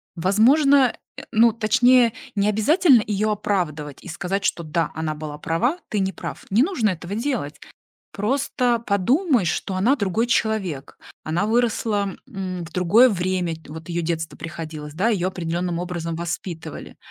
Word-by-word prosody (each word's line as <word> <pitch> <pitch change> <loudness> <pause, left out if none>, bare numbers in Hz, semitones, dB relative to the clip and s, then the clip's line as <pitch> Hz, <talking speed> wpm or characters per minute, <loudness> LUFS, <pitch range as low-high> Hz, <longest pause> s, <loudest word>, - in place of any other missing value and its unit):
Возможно, 250 - +4 0.2
э, - - -7
ну, 230 +1 +5
точнее, 235 +2 +4 0.2
не 200 0 +2
обязательно 255 - +4
её 215 +1 0
оправдывать 160 -8 -3
и - - -11
сказать, 180 +4 -3
что 170 - 0
да, 160 0 -1
она 160 0 -2
была 150 -1 -7
права, 240 - 0
ты 210 - -1
не 190 0 -1
прав. - - -7
Не 215 +6 +4
нужно 265 - +1
этого 180 +2 -6
делать. 225 - -3 0.5
Просто 245 +2 0
подумай, 240 - +2
что 180 +3 -2
она 225 +9 +3
другой 205 +1 0
человек. 200 - -1 0.3
Она 170 +6 0
выросла, 220 -4 0
м, 185 -2 -5
в 165 - -12
другое 195 +8 +5
время, 180 -4 -1
т 160 - -19
вот 160 +1 -9
её 170 0 -2
детство 160 -1 -3
приходилось, 155 -3 -7
да, 190 +8 +1
её 190 -5 +1
определённым 175 -1 -3
образом 170 -2 -4
воспитывали. 170 -1 -6
190 Hz, 155 wpm, -22 LUFS, 170-230 Hz, 0.5 s, ну